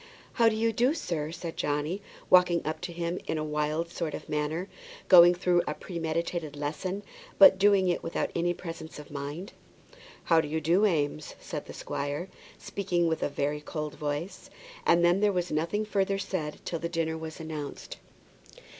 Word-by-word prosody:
"How 230 -2 +5
do 220 - -2
you 225 +1 +1
do, 250 +7 +2
sir?" 160 - -3
said 170 -1 -6
Johnny, 150 +7 -1 0.3
walking 180 -2 +5
up 155 0 -3
to 180 -1 -4
him 170 +1 -3
in 160 - -1
a 155 - -1
wild 155 +2 -1
sort 160 -3 -3
of - - -9
manner, 150 +4 -2 0.4
going 175 -1 +9
through 180 -1 +2
a - - -2
premeditated 170 -2 -3
lesson, 155 +7 -3 0.3
but 190 -1 +8
doing 200 -1 +5
it 175 - +1
without 165 - -2
any 175 +1 +1
presence 165 -2 -7
of 150 0 -11
mind. 145 +6 -6 0.7
"How 165 -1 +4
do 155 - -5
you 160 +2 -1
do, 175 +7 +3
Eames?" 150 -4 -1
said - - -6
the - - -8
squire, 145 +6 -4 0.3
speaking 180 -4 -1
with 160 -1 -1
a - - 0
very 145 +1 -2
cold 150 0 -5
voice. 150 +5 -4 0.4
And 170 0 +5
then 175 +2 +4
there 205 0 +3
was 180 -2 -1
nothing 170 +8 0
further 195 -2 0
said 185 -6 -4
till 170 - -3
the 170 - -3
dinner 165 -2 -1
was 160 0 -7
announced. 155 -3 -6
170 Hz, 180 wpm, -29 LUFS, 155-185 Hz, 0.7 s, going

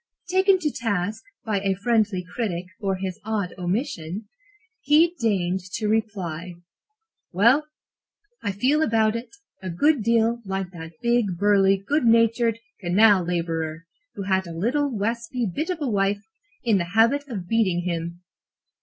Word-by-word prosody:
Taken 380 +1 +4
to 315 -5 -1
task 210 -4 -2 0.2
by 210 -3 0
a 195 0 0
friendly 205 -3 +1
critic 185 -8 -2
for 195 -2 -1
his 185 -1 -5
odd 210 -4 -2
omission, 180 - -3 0.5
he 315 +4 +4
deigned 190 -5 +1
to 215 - -1
reply: 185 -6 -2 0.8
"Well, 235 - +4 0.7
I 200 - -1
feel 260 +10 +2
about 220 -5 +2
it 230 +2 -5 0.3
a 190 - -5
good 285 - +2
deal 230 +1 +2
like 190 -2 -3
that 165 -2 -9
big, 235 -6 +1
burly, 195 0 +4
good 265 +9 0
natured 230 0 +3 0.2
canal 195 +1 +4
laborer 165 -2 -2 0.3
who 200 - -4
had 190 -1 0
a 165 -1 -7
little 275 - +1
waspy 235 +2 -2
bit 290 - -3
of 360 -3 -2
a 290 - 0
wife, 200 -2 0 0.4
in 220 -5 +3
the 175 +3 -5
habit 275 +6 +3
of 195 -9 -6
beating 190 -6 +1
him. 170 0 -4
205 Hz, 145 wpm, -24 LUFS, 185-235 Hz, 0.8 s, Taken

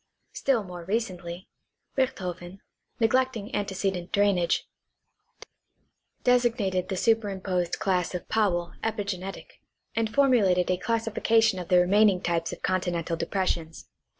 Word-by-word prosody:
Still 255 -6 +1
more 180 -2 -8
recently, 185 -3 -3 0.5
Richthofen, 185 -8 -3 0.4
neglecting 230 -2 +1
antecedent 190 -3 -2
drainage, 200 -4 +2 1.6
designated 235 -7 +2
the 190 - -2
superimposed 190 -5 0
class 180 -2 0
of 180 - -5
Powell 175 -6 0
epigenetic, 200 -4 -4 0.3
and 225 -1 0
formulated 210 -10 +3
a 180 - +1
classification 225 -1 +1
of 175 - -6
the 180 0 +4
remaining 195 +2 +4
types 170 -2 -1
of - - -9
continental 175 -3 -1
depressions 165 -2 -2
(Die. - - -34
190 Hz, 110 wpm, -27 LUFS, 180-225 Hz, 1.6 s, the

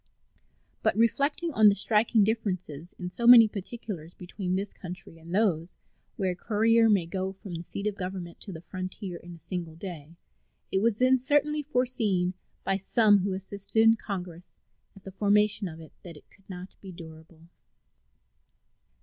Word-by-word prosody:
But - - +1
reflecting 285 +8 +1
on 215 -3 +7
the 200 - +2
striking 215 +2 +3
difference 205 -4 -1 0.3
in 180 -1 -7
so 235 +4 -2
many 240 -2 +10
particulars 200 -5 -7
between 180 0 -4
this 195 +2 -3
country 175 -2 -10
and 165 +1 -12
those 185 -4 0 0.4
where 190 -2 0
a - - -5
courier 225 +3 +3
may 200 -5 +3
go 190 +2 -3
from 195 -1 -10
the 165 0 -5
seat 200 +3 -6
of 210 - 0
government 185 -3 -6
to 200 - -8
the 160 -3 -8
frontier 185 0 -6
in 175 0 -11
a - - -16
single 170 0 -6
day, 165 -3 -9 0.6
it 190 - +2
was 230 -1 +2
then 255 +3 +4
certainly 290 +3 +1
foreseen 230 -10 0 0.3
by 195 - +1
some 205 +1 +4
who 195 +1 -1
assisted 195 +3 -3
in 225 0 +6
Congress 180 -5 -7 0.4
at 195 - -16
the 195 - -9
formation 210 +1 +2
of 160 -2 -9
it 160 -2 -13
that 170 -4 -11
it - - -20
could 195 -1 -25
not 185 0 -9
be 195 - -9
durable. 160 -1 -13
195 Hz, 170 wpm, -28 LUFS, 180-220 Hz, 0.6 s, many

